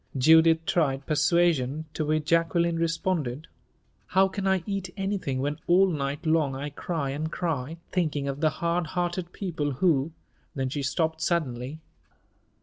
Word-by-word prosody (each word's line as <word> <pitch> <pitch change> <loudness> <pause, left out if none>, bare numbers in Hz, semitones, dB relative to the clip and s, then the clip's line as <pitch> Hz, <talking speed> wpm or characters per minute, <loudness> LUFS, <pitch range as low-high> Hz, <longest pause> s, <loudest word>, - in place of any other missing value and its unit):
Judith 160 +4 +5
tried 135 -5 +1
persuasion, 155 -2 +2
to 155 - -2
which 155 0 0
Jacqueline 170 +1 +2
responded, 165 -4 -1 0.6
"How 190 +1 +4
can 195 +1 -3
I 190 -2 +2
eat 195 -3 -3
anything, 195 -10 -2
when 145 +2 -2
all 190 +2 +5
night 145 0 -3
long 155 -4 +2
I 145 +2 -5
cry 145 -2 -3
and 155 +3 -3
cry, 160 -3 -2
thinking 155 -6 0
of 140 0 -3
the 155 - +4
hard 170 +2 -1
hearted 175 0 -1
people 155 -7 -3
who 150 0 +2 0.2
" - - -39
Then 130 -2 -1
she 145 +2 -3
stopped 160 +3 -1
suddenly. 145 -3 -2
160 Hz, 150 wpm, -27 LUFS, 140-175 Hz, 0.6 s, Judith